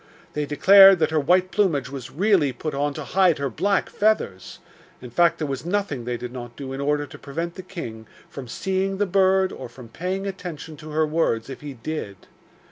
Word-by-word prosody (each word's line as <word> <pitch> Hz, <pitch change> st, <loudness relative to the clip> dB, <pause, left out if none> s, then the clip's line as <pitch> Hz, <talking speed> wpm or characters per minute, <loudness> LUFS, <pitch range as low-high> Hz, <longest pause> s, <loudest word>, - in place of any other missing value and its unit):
They 150 Hz, -1 st, -2 dB
declared 195 Hz, +6 st, +8 dB
that 160 Hz, -1 st, +1 dB
her 160 Hz, -, +2 dB
white 180 Hz, +5 st, +2 dB
plumage 150 Hz, -, +1 dB
was 135 Hz, -3 st, -7 dB
really 185 Hz, -5 st, +2 dB
put 150 Hz, +5 st, -5 dB
on 145 Hz, +1 st, -1 dB
to 155 Hz, -, -5 dB
hide 185 Hz, +1 st, +3 dB
her 140 Hz, -2 st, -2 dB
black 195 Hz, -, +1 dB
feathers 205 Hz, -, -1 dB, 0.4 s
in 125 Hz, -1 st, -10 dB
fact 170 Hz, +7 st, +3 dB
there 155 Hz, -, -2 dB
was 135 Hz, -2 st, -4 dB
nothing 175 Hz, -, -2 dB
they 120 Hz, 0 st, -2 dB
did 125 Hz, +1 st, -7 dB
not 120 Hz, -2 st, -8 dB
do 135 Hz, -2 st, -6 dB
in 135 Hz, -, -4 dB
order 145 Hz, +1 st, 0 dB
to 135 Hz, -, -13 dB
prevent 165 Hz, +4 st, -4 dB
the 185 Hz, -, -8 dB
king 120 Hz, -, -8 dB, 0.2 s
from 135 Hz, -3 st, -9 dB
seeing 190 Hz, +8 st, -2 dB
the 205 Hz, -, +1 dB
bird 190 Hz, 0 st, +3 dB
or 130 Hz, -, -8 dB
from 120 Hz, -1 st, -13 dB
paying 185 Hz, -, -3 dB
attention 175 Hz, -5 st, -6 dB
to 155 Hz, -, -10 dB
her 155 Hz, +1 st, +1 dB
words 150 Hz, -6 st, 0 dB
if -, -, -9 dB
he 145 Hz, -2 st, -7 dB
did. 115 Hz, -6 st, -6 dB
155 Hz, 210 wpm, -23 LUFS, 135-185 Hz, 0.4 s, declared